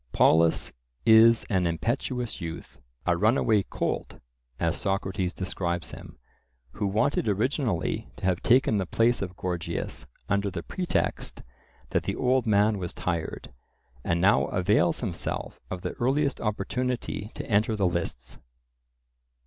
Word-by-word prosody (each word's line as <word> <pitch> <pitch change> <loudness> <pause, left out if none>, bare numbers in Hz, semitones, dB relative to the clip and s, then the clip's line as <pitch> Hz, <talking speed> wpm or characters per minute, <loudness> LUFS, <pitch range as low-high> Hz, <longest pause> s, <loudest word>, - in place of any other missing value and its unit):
Polus 80 +1 +4 0.3
is 115 +1 +7
an 95 -4 +1
impetuous 120 - -2
youth, 85 0 -7 0.3
a 85 - +3
runaway 110 +2 +3
"colt," - - -3 0.4
as 85 0 +1
Socrates 95 -2 -1
describes 90 -2 -3
him, - - -11 0.5
who 100 - -2
wanted 110 +5 +1
originally 110 - 0
to - - -6
have 95 -1 +1
taken 120 -3 +4
the 95 - -2
place 115 +4 +2
of 90 -2 -5
Gorgias 90 -2 -3 0.2
under 100 +1 +1
the 85 -3 -5
pretext 180 -2 -2 0.5
that - - +2
the - - -1
old 125 -1 +1
man 105 0 +3
was 90 -2 -5
tired, 85 -7 -3 0.5
and 85 - 0
now 100 +4 +4
avails 90 -2 +2
himself - - -4
of 90 0 -5
the - - -2
earliest 140 +3 +1
opportunity 115 0 -2
to - - -5
enter 110 +1 +2
the 100 -2 +1
lists. 85 -8 -3
100 Hz, 135 wpm, -27 LUFS, 90-115 Hz, 0.5 s, is